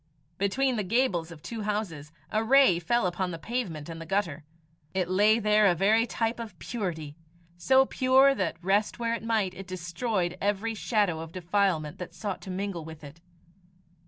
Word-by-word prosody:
Between 250 +6 +1
the 210 - 0
gables 190 -5 +1
of 165 -3 -12
two 230 -2 -5
houses, 200 -8 -3 0.2
a 215 +1 +1
ray 260 -7 +5
fell 235 +6 +1
upon 180 +1 -1
the 170 - -5
pavement 175 -7 -4
and 165 -1 -7
the - - -7
gutter. 170 -5 -1 0.5
It 185 -2 +1
lay 205 +4 +4
there 210 -1 +4
a 175 - +3
very 220 +6 +3
type 230 0 -1
of 220 -6 -7
purity, 160 -11 -4 0.4
so 265 +10 +4
pure 265 +1 +4
that, 185 -9 -2
rest 200 +3 +1
where 230 -1 -1
it 230 - -3
might, 220 -5 0
it 195 +1 -9
destroyed 180 +1 -2
every 205 +3 0
shadow 205 -6 0
of 160 0 -7
defilement 180 -4 0
that 175 -1 -7
sought 200 0 -4
to - - -9
mingle 185 -2 -3
with 160 -1 -10
it. 145 +3 -12
195 Hz, 180 wpm, -28 LUFS, 170-225 Hz, 0.5 s, ray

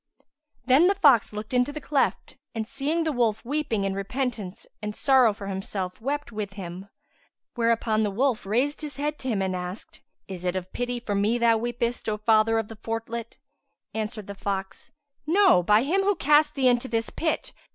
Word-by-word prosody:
Then 270 +7 +6
the 395 - +3
fox 285 - +5
looked 215 +3 -7
into 250 +3 +2
the 305 - -6
cleft 280 -1 -1 0.2
and, 220 -1 -3
seeing 295 +6 -1
the 320 - 0
wolf 235 -5 0
weeping 260 -6 -1
in 195 0 -1
repentance 210 -1 -4 0.2
and 210 0 -4
sorrow 260 -4 +5
for 200 -1 -8
himself, 190 0 -4
wept 290 +3 -3
with 210 -3 -5
him; 190 0 -8 0.6
whereupon 230 -2 +1
the 210 - +1
wolf 245 +3 0
raised 250 +10 0
his 295 -2 -6
head 295 +1 -2
to 265 - -6
him 210 -6 0
and 185 -1 -1
asked, 180 +3 -7 0.3
"Is 185 -2 -7
it 180 0 -1
of 185 0 -5
pity 245 0 -2
for 225 -3 -4
me 205 +4 +2
thou 230 -1 +4
weepest, 235 0 -2
O 210 - -1
Father 220 +1 +3
of 225 -2 -1
the 225 - -10
Fortlet[FN#152]?" 225 +1 -5 0.6
Answered 215 -1 -4
the 200 - -7
fox, 195 -1 -5 0.4
"No, 375 - +5
by 210 +6 +4
Him 360 +8 +1
who 400 +1 +2
cast 300 -1 +3
thee 265 -2 +3
into 245 +1 +2
this 225 -1 -2
pit! 320 -1 -2
225 Hz, 190 wpm, -26 LUFS, 205-270 Hz, 0.6 s, Then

